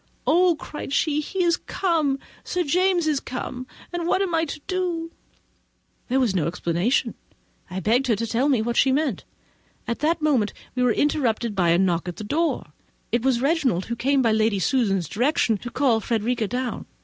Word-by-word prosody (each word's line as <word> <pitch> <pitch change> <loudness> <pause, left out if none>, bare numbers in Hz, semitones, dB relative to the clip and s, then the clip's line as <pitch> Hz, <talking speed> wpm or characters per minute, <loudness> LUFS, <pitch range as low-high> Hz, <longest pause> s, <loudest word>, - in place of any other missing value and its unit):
"Oh!" 345 0 +4
said 295 - -7
she, 300 0 +1
"he 370 +4 -2
is 340 0 +3
come—Sir 330 0 -2
James 355 +2 +2
is 300 -3 +1
come, 255 0 -6 0.3
and 345 -1 -2
what 370 - +2
shall 385 -3 -1
I 325 0 +1 0.2
do?" 350 -3 -2 1.0
This 260 - +2
was 250 -7 +2
no 165 -5 0
explanation; 175 +7 0 0.6
I 185 +1 -4
begged 240 +8 +2
her 230 - +3
to 230 +3 -2
tell 240 +5 +1
me 250 -6 +2
what 235 +1 -2
she 270 - +4
meant. 275 - 0 0.6
At 235 - -2
that 320 +3 +1
moment 275 -9 +1 0.2
we 250 - -2
were 250 -1 +4
interrupted 235 -4 0
by 180 -4 +2
a 170 - +4
knock 175 -2 +1
at 175 - -4
the 215 - -7
door: 270 - -1 0.4
it 235 - +1
was 255 -1 +1
Reginald, 275 - +1
who 235 - -3
came, 270 +3 +2
by 230 - +3
Lady 220 -1 +2
Susan's 195 - +1
direction, 240 - +1
to 240 - -6
call 250 -3 +2
Frederica 230 +1 -1
down. 250 +2 -3
255 Hz, 185 wpm, -24 LUFS, 220-310 Hz, 1.0 s, Oh